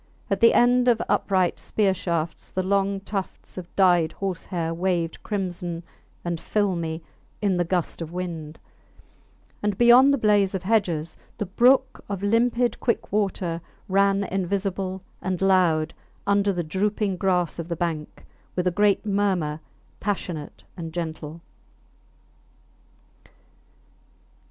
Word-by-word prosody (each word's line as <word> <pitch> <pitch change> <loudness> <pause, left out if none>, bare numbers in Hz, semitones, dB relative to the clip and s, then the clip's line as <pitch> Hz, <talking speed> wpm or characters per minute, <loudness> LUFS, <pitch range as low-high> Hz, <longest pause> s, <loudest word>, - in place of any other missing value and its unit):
At 195 - +1
the 230 - +6
end 245 +1 +4
of 235 -3 +4
upright 185 -3 +1
spear 200 -3 +1
shafts 170 -3 -3
the 185 - -2
long 195 0 +1
tufts 195 -1 -5
of 180 -2 -7
dyed 175 -4 +4
horse 190 -3 -4
hair 165 -3 -2
waved 170 -1 -1
crimson 175 -4 -3 0.4
and 170 -1 -2
filmy 170 -5 -1 0.4
in 200 -4 +1
the 175 - +2
gust 175 0 -2
of 165 -1 -5
wind; 170 -4 -5 1.0
and 205 -2 -1
beyond 245 +3 +7
the 280 - +3
blaze 205 -4 +3
of 185 - -3
hedges 180 -7 0 0.2
the 210 - -2
brook 260 +7 +3
of 200 -1 -4
limpid 235 +2 +2
quick 235 - -1
water 190 -5 -1 0.3
ran 195 +1 +3
invisible 190 0 -2 0.2
and 185 -2 -2
loud 175 -5 +3 0.3
under 200 0 +3
the 175 -2 -2
drooping 200 +4 0
grass 180 -3 0
of 165 - -4
the 170 - -2
bank, 160 -2 -4 0.3
with 180 - 0
a 180 - +3
great 205 +3 +2
murmur, 190 -7 0 0.4
passionate 180 -7 -4
and 165 -3 -6
gentle. 160 -1 -5
190 Hz, 130 wpm, -25 LUFS, 170-205 Hz, 1.0 s, beyond